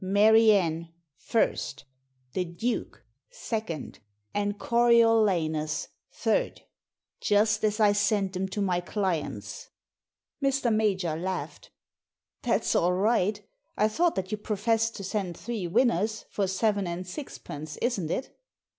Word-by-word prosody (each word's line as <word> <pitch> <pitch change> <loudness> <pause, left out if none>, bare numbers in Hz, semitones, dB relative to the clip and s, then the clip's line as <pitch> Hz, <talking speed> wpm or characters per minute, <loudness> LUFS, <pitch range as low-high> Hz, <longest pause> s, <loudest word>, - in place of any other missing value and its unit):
" - - -9
Mary 215 +3 +6
Anne, 170 -4 +1 0.4
i; 230 - +3 0.8
The 185 - 0
Duke, 180 +8 -3 0.3
2; 220 - -4 0.4
and 205 0 -1
Coriolanus, 215 -11 +3 0.2
3; - - 0 0.6
just 210 +1 +2
as 215 0 +1
I 210 -2 +5
sent 205 -2 +1
'em 190 +1 -1
to 205 +1 -2
my 180 -2 +1
clients! 180 -4 -3 0.4
" - - -21
Mr. 270 -4 +2
Major 195 -7 +1
laughed. 185 +2 -5 0.4
" - - -63
That's - - +1
all 175 +1 +3
right 205 +1 +1 0.3
I 215 - +4
thought 330 +10 +1
that 190 0 -3
you 215 - -2
professed 225 +2 0
to 200 - -6
send 190 -3 -3
three 220 -6 -4
winners, 215 +2 +1
for 200 -2 0
seven 200 0 0
and 175 +2 -4
sixpence, 155 - -7
isn't 205 -10 -1
it 260 - -3
205 Hz, 130 wpm, -27 LUFS, 180-225 Hz, 0.8 s, Mary